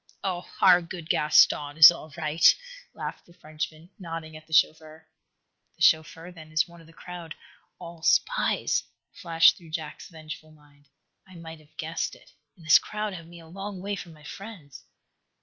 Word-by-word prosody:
"Oh, 180 -2 -4
our 180 -2 +7
good 170 -1 -9
Gaston 150 -1 +3
is 155 0 +11
all 160 -2 -10
right," 155 0 +4 0.4
laughed - - -7
the 170 - -20
Frenchman, 155 +2 -7
nodding 165 -3 -7
at 155 0 -13
the - - -22
chauffeur. 160 0 +1 0.7
"The - - -25
chauffeur, 165 +2 +2
then, 160 -3 -14
is 155 +2 +1
one 170 -1 -16
of 165 - -18
the - - -17
crowd 170 -1 -10 0.4
all 170 -1 -11
spies," 170 - +1 0.3
flashed 170 -5 +4
through 170 -2 -15
Jack's 155 -1 -7
vengeful 155 -1 -10
mind. 145 -1 -24 0.4
"I 185 - -16
might 165 -1 -10
have 155 -1 -25
guessed 160 +1 -3
it. - - -20 0.3
And 165 - -17
this 160 - +7
crowd 210 -1 -5
have 165 -3 -9
me 170 0 -13
a 165 - -14
long 195 +3 -7
way 200 +2 -3
from 175 -3 -9
my 150 -1 -18
friends." 180 -6 -11
165 Hz, 175 wpm, -26 LUFS, 155-175 Hz, 0.7 s, is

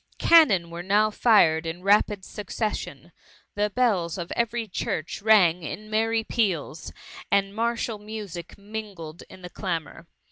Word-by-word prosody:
Cannon 210 - +5
were 170 +1 -6
now 205 +4 +2
fired 165 -9 +4
in 175 +2 -6
rapid 205 -1 +2
succession; 205 - -5 0.4
the 210 +1 0
bells 200 -8 0
of 175 -2 -6
every 235 -1 -1
church 175 -3 -4
rang 190 -5 +4
in 215 +7 -7
merry 225 +1 +1
peals, 180 - -2 0.4
and 200 0 +1
martial 230 -1 -2
music 205 -5 -8
mingled 200 -6 -8
in 185 - -14
the 180 - -7
clamour. 170 -3 -5
200 Hz, 135 wpm, -25 LUFS, 170-220 Hz, 0.4 s, Cannon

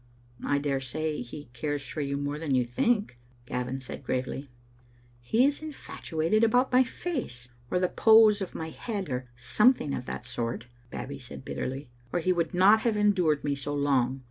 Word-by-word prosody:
"I 145 - +1
dare 140 -1 0
say 150 +3 -3
he 125 +3 -9
cares 145 +3 -3
for 155 - -4
you 140 0 -1
more 145 +1 -3
than 150 -4 0
you 125 -1 +2
think," 200 - 0 0.3
Gavin 125 +2 -3
said 130 - -8
gravely. 130 +2 -3 0.4
" 120 - -30 0.3
He 225 - +3
is 285 +2 +1
infatuated 215 - -1
about 245 +4 +3
my 255 +1 +6
face, 245 - -5 0.2
or - - +1
the 180 0 +2
pose 220 0 +6
of 190 - -5
my 160 0 -4
head, 200 -5 -4
or 125 0 -3
something 210 - +3
of 125 - -4
that - - -5
sort," 120 -1 -3 0.2
Babbie 140 +2 -6
said 130 +1 -10
bitterly, 135 +1 -4 0.2
"or - - +1
he 185 +2 +2
would 170 -2 0
not 195 +5 +6
have 220 -1 0
endured 185 -8 +3
me 145 - 0
so 140 +1 -3
long. 135 -2 +1
150 Hz, 185 wpm, -28 LUFS, 130-205 Hz, 0.4 s, my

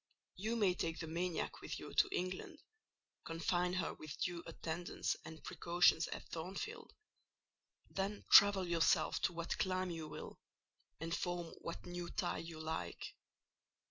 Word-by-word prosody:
You 220 +5 -1
may 205 -5 +4
take 165 -2 -2
the 165 - -4
maniac 170 +2 -2
with - - -4
you - - -8
to - - +5
England; 185 +1 -2 0.7
confine 175 +2 0
her 185 -2 0
with 155 -2 -8
due 175 -2 -1
attendance 170 +2 -2
and 160 -1 -9
precautions 170 -2 +4
at - - -6
Thornfield: 175 +4 -5 1.0
then 195 +2 -3
travel 200 -2 +9
yourself 170 -1 +3
to 180 - +2
what 170 0 -3
clime 185 -1 +1
you 165 -2 -4
will, - - -8 0.6
and 165 +2 -1
form 175 -2 -2
what 170 - -5
new 175 -1 -4
tie - - -1
you 165 -1 -7
like. 155 - -4
175 Hz, 140 wpm, -38 LUFS, 165-185 Hz, 1.0 s, travel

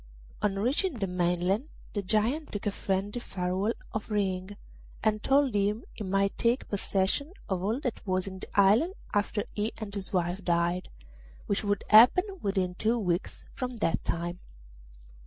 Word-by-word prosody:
On 195 -1 +1
reaching 275 - +1
the 210 -4 -1
mainland 180 +5 +1 0.3
the 205 - -1
Giant 220 +10 0
took 205 - -5
a 205 - +1
friendly 195 +4 -2
farewell 190 +2 -1 0.2
of 220 0 -4
Ring, 195 -1 -1 0.5
and 215 -1 +2
told 275 -1 +3
him 205 +2 +1
he 215 - -6
might 195 +1 +1
take 240 +2 +2
possession 200 - 0
of 190 -2 -1
all 215 +7 0
that 250 -5 -3
was 185 0 +1
in 190 -1 -7
the - - -8
island 225 - +5 0.2
after 205 0 +1
he 215 +2 -1
and 210 -2 -6
his 195 -2 -4
wife 180 +1 0
died, 175 +1 +1 0.6
which 200 - 0
would 205 -1 0
happen 235 +11 +8 0.2
within 190 -2 0
two 220 +6 +1
weeks 180 -4 -2
from 250 -2 -4
that 165 -7 0
time. 175 +1 -2
200 Hz, 160 wpm, -29 LUFS, 185-220 Hz, 0.6 s, happen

